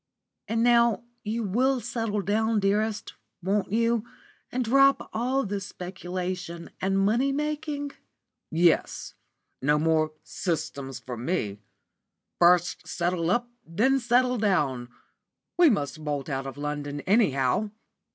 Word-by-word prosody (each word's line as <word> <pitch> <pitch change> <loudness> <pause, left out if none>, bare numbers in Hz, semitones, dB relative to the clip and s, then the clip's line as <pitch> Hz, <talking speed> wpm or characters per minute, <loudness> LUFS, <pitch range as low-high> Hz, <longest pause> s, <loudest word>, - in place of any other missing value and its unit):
"And 225 +1 +1
now 235 -1 +4 0.2
you 225 +2 -2
will 250 +7 +2
settle 225 -3 -2
down, 220 +3 +1
dearest, 210 +2 0 0.3
won't 195 +1 0
you, 230 0 +2 0.5
and 250 0 -1
drop 275 +3 +4
all 255 +4 0
this 195 -1 -3
speculation 180 -1 -5
and 195 +1 +1
money 225 +8 +2
making?" 295 0 -2 0.6
"Yes, 170 +1 +1 0.5
no 150 +3 +3
more 155 0 +2
'systems' 140 -6 -3
for 125 -2 -7
me. 110 - -2 0.8
First 175 0 +4
settle 175 -1 -1
up, 240 +6 +1 0.2
then 230 +11 +2
settle 250 0 +2
down. 140 - +1 0.7
We 345 -2 +6
must 155 - -1
bolt 145 -1 -3
out 135 -1 -3
of 135 - -7
London, 145 0 -4
anyhow." 190 - +2
195 Hz, 120 wpm, -27 LUFS, 160-235 Hz, 0.8 s, We